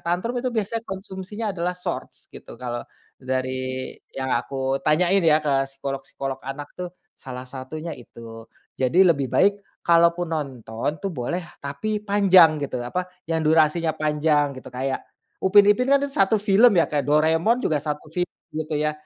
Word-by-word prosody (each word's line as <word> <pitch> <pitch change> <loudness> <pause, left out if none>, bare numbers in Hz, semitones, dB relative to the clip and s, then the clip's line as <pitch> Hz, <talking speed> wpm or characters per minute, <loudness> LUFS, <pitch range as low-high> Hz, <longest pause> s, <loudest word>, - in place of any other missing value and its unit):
tantrum 180 +8 -1
itu 255 - -1
biasanya 225 0 -2
konsumsinya 190 +3 -6
adalah 180 0 -2
Shorts, 180 - -6
gitu. - - -11
Kalau 120 -1 -4 0.4
dari 130 0 -3 0.2
yang 130 -1 -2
aku 135 +2 -1
tanyain 175 +7 +3
ya 155 -2 +5
ke 135 -2 +2
psikolog-psikolog 135 0 -5
anak 140 +2 -7
tuh, 180 -1 -5 0.3
salah 125 -1 -8
satunya 140 +6 -6
itu. 115 -2 -12 0.3
Jadi, 165 +9 +4
lebih 140 -7 +2
baik 200 +9 +4 0.3
kalaupun 170 0 +3
nonton 135 -1 -3
tuh 195 - -2
boleh, 150 +5 -2 0.2
tapi 210 +10 -3
panjang, 190 -6 +6
gitu, 140 -2 -3
apa, 180 +9 -3 0.2
yang 165 -1 0
durasinya 160 +1 +3
panjang, 150 -1 +1
gitu. 130 - -9
Kayak 130 +1 -2 0.4
Upin 200 +2 +6
Ipin 250 +6 +3
kan 280 0 +5
1 270 -7 +2
film 205 +2 +5
ya, - - +4
kayak 145 -3 -1
Doraemon 160 +9 +3
juga 150 -2 +1
1 150 +1 -5
film 180 0 -1 0.2
gitu 155 0 -3
ya. 150 0 0
155 Hz, 155 wpm, -23 LUFS, 135-185 Hz, 0.4 s, panjang